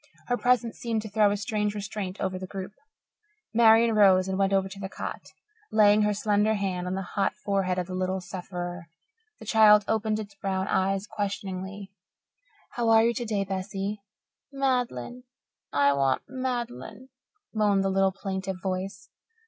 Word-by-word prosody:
Her 245 Hz, -, +3 dB
presence 245 Hz, -2 st, +1 dB
seemed 225 Hz, -2 st, -2 dB
to 215 Hz, -, -7 dB
throw 210 Hz, 0 st, +4 dB
a 205 Hz, -, 0 dB
strange 210 Hz, -1 st, -1 dB
restraint 200 Hz, -2 st, -5 dB
over 185 Hz, -1 st, -2 dB
the 185 Hz, -, -6 dB
group. 195 Hz, 0 st, -7 dB, 0.8 s
Marian 230 Hz, 0 st, +6 dB
rose 190 Hz, -3 st, +5 dB
and 190 Hz, -, -1 dB
went 195 Hz, 0 st, +1 dB
over 195 Hz, -1 st, +2 dB
to 195 Hz, +1 st, -10 dB
the 190 Hz, -1 st, -5 dB
cot, -, -, -6 dB, 0.4 s
laying 210 Hz, -1 st, +5 dB
her 210 Hz, 0 st, +2 dB
slender 210 Hz, +1 st, +2 dB
hand 185 Hz, -3 st, -2 dB
on 185 Hz, -, -2 dB
the 195 Hz, -, -3 dB
hot 195 Hz, +2 st, -1 dB
forehead 195 Hz, -2 st, 0 dB
of 180 Hz, -, -1 dB
the 185 Hz, -, -7 dB
little 185 Hz, +1 st, -1 dB
sufferer. 175 Hz, -1 st, -6 dB, 0.5 s
The -, -, -11 dB
child 210 Hz, -2 st, +6 dB
opened 220 Hz, -1 st, 0 dB
its 205 Hz, -2 st, -7 dB
brown 195 Hz, -1 st, -2 dB
eyes 195 Hz, +1 st, 0 dB
questioningly. 195 Hz, -2 st, -5 dB, 0.8 s
"How 235 Hz, -1 st, 0 dB
are 225 Hz, 0 st, +6 dB
you 235 Hz, -, +2 dB
today, 220 Hz, -4 st, -1 dB
Bessie?" 195 Hz, +1 st, -4 dB, 0.5 s
"Mad'len 250 Hz, -, -1 dB, 0.5 s
I 140 Hz, 0 st, +3 dB
want 135 Hz, -1 st, +1 dB
Mad'len," 250 Hz, -, -5 dB, 0.4 s
moaned 205 Hz, -3 st, +2 dB
the 195 Hz, -, 0 dB
little 195 Hz, 0 st, +3 dB
plaintive 190 Hz, -1 st, -4 dB
voice. 190 Hz, +1 st, -4 dB
200 Hz, 160 wpm, -27 LUFS, 190-215 Hz, 0.8 s, Marian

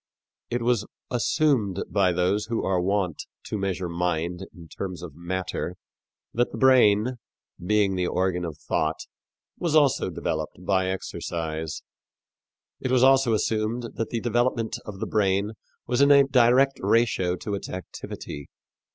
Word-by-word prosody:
It 120 Hz, 0 st, -1 dB
was 115 Hz, -3 st, +1 dB, 0.2 s
assumed 120 Hz, -, +1 dB
by 100 Hz, -3 st, +2 dB
those 90 Hz, +4 st, +1 dB
who 115 Hz, -1 st, -1 dB
are 95 Hz, -2 st, +1 dB
wont 95 Hz, -3 st, -1 dB, 0.2 s
to -, -, -5 dB
measure 95 Hz, -2 st, -2 dB
mind 85 Hz, +1 st, -2 dB
in 85 Hz, -2 st, -13 dB
terms 90 Hz, +1 st, -6 dB
of 85 Hz, -5 st, -8 dB
matter 90 Hz, +2 st, -4 dB, 0.6 s
that 120 Hz, +1 st, +1 dB
the -, -, -6 dB
brain, 125 Hz, -2 st, +4 dB, 0.5 s
being 105 Hz, 0 st, +2 dB
the 90 Hz, -1 st, 0 dB
organ 90 Hz, -1 st, 0 dB
of 80 Hz, -4 st, -5 dB
thought, 80 Hz, 0 st, -1 dB, 0.6 s
was 165 Hz, -3 st, 0 dB
also 140 Hz, -9 st, +4 dB
developed 80 Hz, +1 st, -4 dB
by 95 Hz, -1 st, +2 dB
exercise. 80 Hz, -4 st, -4 dB, 1.0 s
It 130 Hz, -, -3 dB
was 125 Hz, 0 st, +4 dB
also 135 Hz, -3 st, +5 dB
assumed 110 Hz, +2 st, -1 dB
that 115 Hz, -, -3 dB
the 115 Hz, -, -2 dB
development 120 Hz, -1 st, 0 dB
of 100 Hz, -3 st, -8 dB
the -, -, 0 dB
brain 100 Hz, 0 st, +1 dB, 0.3 s
was 125 Hz, +2 st, +1 dB
in 140 Hz, -, +6 dB
a 140 Hz, -1 st, +8 dB
direct 135 Hz, +1 st, +4 dB
ratio 105 Hz, -6 st, +2 dB
to 100 Hz, +3 st, -5 dB
its 100 Hz, -, -4 dB
activity. 75 Hz, -5 st, -7 dB
100 Hz, 145 wpm, -25 LUFS, 90-120 Hz, 1.0 s, a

